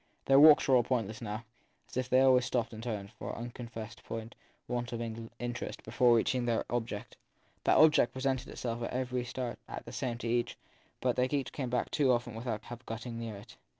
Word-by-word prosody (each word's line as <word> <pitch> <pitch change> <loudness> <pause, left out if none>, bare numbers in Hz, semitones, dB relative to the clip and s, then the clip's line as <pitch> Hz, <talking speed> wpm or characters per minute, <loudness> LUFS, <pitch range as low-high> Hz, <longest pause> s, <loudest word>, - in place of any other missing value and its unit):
Their 135 0 +6
walks 150 0 +8
were 135 - +6
all 125 - +6
pointless 110 -4 -1
now, 110 +1 -5 0.4
as - - -13
if 130 0 -1
they 130 0 +5
always 130 -1 +6
stopped 120 -2 -1
and 110 - -7
turned, 105 -4 -4
for - - -7
an - - -4
unconfessed 115 -1 -7 0.7
want 120 0 -2
of 115 -1 -5
interest, 120 0 -4
before 120 -2 +4
reaching 125 +2 +2
their 115 -1 +1
object. 115 -3 -3 0.5
That - - +5
object 155 -5 +6
presented 130 -1 -1
itself 120 -1 -4
at 115 - -2
every 125 -1 -1
start 120 -1 -4
as - - -6
the - - -8
same 120 -2 -2
to 120 - -5
each, 120 +1 0 0.4
but 125 -1 +1
they 125 0 +3
had 135 -3 -2
come 130 -4 -3
back 125 -1 -1
too 140 -4 +3
often 120 -1 0
without 110 -1 -4
having 120 +1 -8
got 115 +1 -5
near 115 -2 -5
it. 100 - -12
120 Hz, 205 wpm, -32 LUFS, 115-125 Hz, 0.7 s, walks